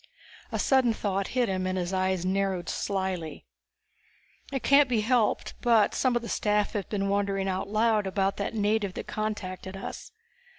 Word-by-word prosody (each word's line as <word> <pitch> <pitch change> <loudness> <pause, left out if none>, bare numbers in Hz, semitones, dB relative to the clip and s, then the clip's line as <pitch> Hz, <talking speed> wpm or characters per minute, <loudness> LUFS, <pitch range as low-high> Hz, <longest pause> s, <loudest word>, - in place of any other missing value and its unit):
A - - -1
sudden 260 -4 +3
thought 200 -2 -1
hit 245 -2 +3
him, 185 -1 -1
and 185 0 -1
his 180 +1 -2
eyes 185 -1 0
narrowed 190 -1 0
slyly. 190 -5 -3 1.1
"It 270 -3 -3
can't 280 -1 +5
be 230 -3 +2
helped, 235 0 +1
but 230 -3 +4
some 255 -2 +1
of 240 - 0
the - - -5
staff 210 -2 0
have 205 -3 -3
been 200 -2 -1
wondering 195 -1 0
out 190 +1 -2
loud 215 -1 +2
about 195 0 0
that 200 +2 -3
native 210 -2 0
that - - -5
contacted 195 -3 -4
us. 195 - -7
200 Hz, 170 wpm, -28 LUFS, 190-220 Hz, 1.1 s, can't